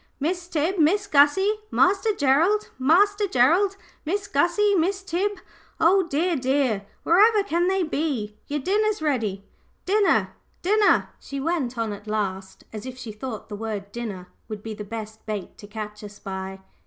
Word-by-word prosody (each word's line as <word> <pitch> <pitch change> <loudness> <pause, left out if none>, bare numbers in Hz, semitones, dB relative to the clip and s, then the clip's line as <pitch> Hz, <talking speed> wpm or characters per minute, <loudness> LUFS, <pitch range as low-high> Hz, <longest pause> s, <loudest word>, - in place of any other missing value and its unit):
"Miss 345 +4 -2
Tib, 340 +3 -1
Miss 385 +7 +3
Gussie, 385 +6 +4
Master 400 +3 +3
Gerald! 340 +6 +2
Master 405 +9 +3
Gerald, 355 +9 +3 0.3
Miss 400 +6 -2
Gussie, 350 +8 +2
Miss 380 +2 +1
Tib! 390 +3 -1 0.5
oh, 375 +4 +5
dear, 335 +3 0
dear, 255 -6 0 0.2
wherever 415 +5 +5
can 350 -2 0
they 380 0 +1
be? 280 -10 -2
Your 295 0 -2
dinner's 420 +6 +1
ready 225 -10 -1 0.4
din 415 +3 +2
ner! - - +2 0.3
din 415 +4 +2
ner!" 415 - +4
she 275 - -6
went 275 -5 -1
on 225 -2 -1
at 205 +1 -11
last, 195 -3 -3
as 215 +3 -6
if 255 0 -8
she 235 -4 -7
thought 220 +1 -7
the 210 - -6
word 205 -2 -5
"dinner" 205 -6 -6 0.2
would 215 -2 -7
be 225 - -5
the 210 0 -7
best 220 +1 -7
bait 210 -3 -5
to 205 - -11
catch 210 0 -7
us 205 0 -10
by. 190 -1 -6
290 Hz, 165 wpm, -24 LUFS, -, 0.5 s, oh